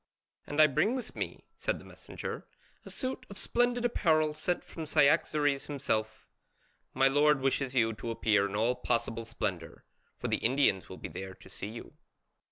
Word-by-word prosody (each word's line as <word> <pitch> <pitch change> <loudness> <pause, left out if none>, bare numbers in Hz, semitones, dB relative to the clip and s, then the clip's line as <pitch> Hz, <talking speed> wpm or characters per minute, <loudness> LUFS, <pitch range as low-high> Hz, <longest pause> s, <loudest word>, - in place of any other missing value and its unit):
"And 145 - -3
I 155 - +10
bring 180 - +2
with 255 - -5
me," - - -4
said - - -1
the - - -13
messenger, - - -7 0.4
"a - - -10
suit 255 0 -4
of 200 - -8
splendid 245 +3 +1
apparel 155 -9 +2
sent 175 +3 -1
from 160 -2 -7
Cyaxares 145 -1 +3
himself: 110 -6 -2 0.7
my 135 +1 +5
lord 145 +1 +4
wishes 135 0 0
you 115 -2 +3
to 110 +2 -6
appear 105 -3 +2
in 100 - -5
all 115 +4 +2
possible 115 -2 -1
splendour, 95 -7 -4 0.3
for - - -3
the - - +1
Indians 125 -6 +2
will 95 - -8
be - - -6
there 95 0 -7
to 95 0 -16
see 100 - -6
you." 115 +2 -9
135 Hz, 175 wpm, -31 LUFS, 110-155 Hz, 0.7 s, I